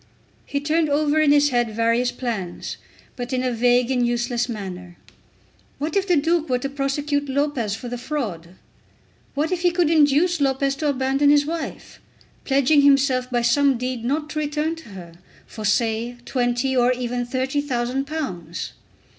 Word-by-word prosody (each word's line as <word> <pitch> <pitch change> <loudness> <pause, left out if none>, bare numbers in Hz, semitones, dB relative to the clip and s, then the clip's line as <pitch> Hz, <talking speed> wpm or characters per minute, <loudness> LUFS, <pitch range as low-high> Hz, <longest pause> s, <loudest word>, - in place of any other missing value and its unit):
He 280 - -1
turned 310 +2 +1
over 295 +1 +2
in 300 -2 +4
his 290 0 +5
head 240 -4 0
various 230 +2 +2
plans, 210 -9 -4 0.4
but 245 0 -5
in 255 -1 0
a 255 - 0
vague 245 +1 +2
and 250 -2 +2
useless 240 0 0
manner. 180 -5 -7 0.8
What 300 +2 -3
if 395 -1 +1
the 355 - +4
Duke 325 +1 +1
were 250 - +2
to 275 +2 -4
prosecute 285 +1 -1
Lopez 265 -7 0
for 235 +3 -8
the 245 0 -5
fraud! 205 - -4 0.8
What 300 +4 0
if 360 -2 -1
he 355 - +4
could 340 -2 +1
induce 310 +2 +3
Lopez 275 0 +1
to 305 -1 0
abandon 270 +1 +2
his 290 0 +5
wife, 330 +1 -6 0.5
pledging 280 +2 +4
himself 275 -3 +3
by 240 -1 0
some 270 +2 +3
deed 250 -1 -3
not 300 +5 -2
to 305 - -2
return 300 +2 -1
to 325 -8 -13
her, 180 -4 -10 0.3
for, 215 - -9
say, 225 +2 0
twenty 245 +1 0
or 250 0 +4
even 245 -1 -2
thirty 260 +3 -1
thousand 260 -1 -2
pounds! 185 - -5
265 Hz, 170 wpm, -22 LUFS, 240-290 Hz, 0.8 s, his